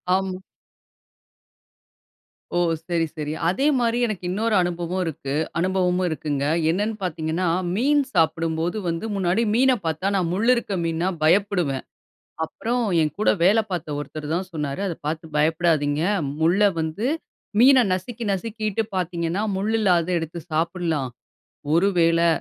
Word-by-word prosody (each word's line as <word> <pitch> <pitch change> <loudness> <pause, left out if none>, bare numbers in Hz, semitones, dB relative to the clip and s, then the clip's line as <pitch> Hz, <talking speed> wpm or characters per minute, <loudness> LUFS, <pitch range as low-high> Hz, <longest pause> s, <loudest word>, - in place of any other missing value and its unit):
ஆமா. 190 -1 -2 2.2
ஓ! - - +3 0.3
சரி, 165 -1 +1
சரி. 150 0 -3
அதே 260 +11 +1
மாரி 235 0 +1
எனக்கு 205 -5 -4
இன்னொரு 215 +3 0
அனுபவம் 175 +1 -1
இருக்கு 140 -3 -4 0.3
அனுபவமும் 185 0 +1
இருக்குங்க. 145 -3 -2 0.2
என்னன்னு 210 +5 0
பார்த்தீங்கன்னா, 165 +1 -1 0.3
மீன் 285 +6 +3
சாப்பிடும்போது 165 +2 +1
வந்து 165 +5 -2
முன்னாடி 185 +3 +1
மீனை 260 +1 +4
பார்த்தா, 160 +4 -1
நான் 180 -3 +1
முள் 205 +6 0
இருக்க 235 -4 -2
மீன்னா 165 +3 0
பயப்படுவேன். 175 -6 +2 0.6
அப்புறம் 240 +8 -2 0.2
என் 155 - 0
கூட 215 - +3
வேல 200 +5 +5
பார்த்த 160 -5 -3
ஒருத்தர் 150 0 -6
தான் 185 +2 -2
சொன்னாரு, 150 +1 -3
"அத 175 - -2
பார்த்து 160 +1 -3
பயப்படாதீங்க, 155 -1 +2 0.4
முள்ளை 175 +5 +3 0.2
வந்து 160 +9 -2 0.5
மீனை 260 0 +7
நசுக்கி 225 +6 -3
நசுக்கிட்டு 215 +1 -2
பார்த்தீங்கன்னா, 175 +2 -1
முள் 205 +3 -1
இல்லாதத 180 -5 +2
எடுத்து 165 +1 -5
சாப்பிடலாம். 165 -4 -1 0.7
ஒரு 180 +4 +4
வேளை 165 0 +4
175 Hz, 130 wpm, -23 LUFS, 160-200 Hz, 2.2 s, மீனை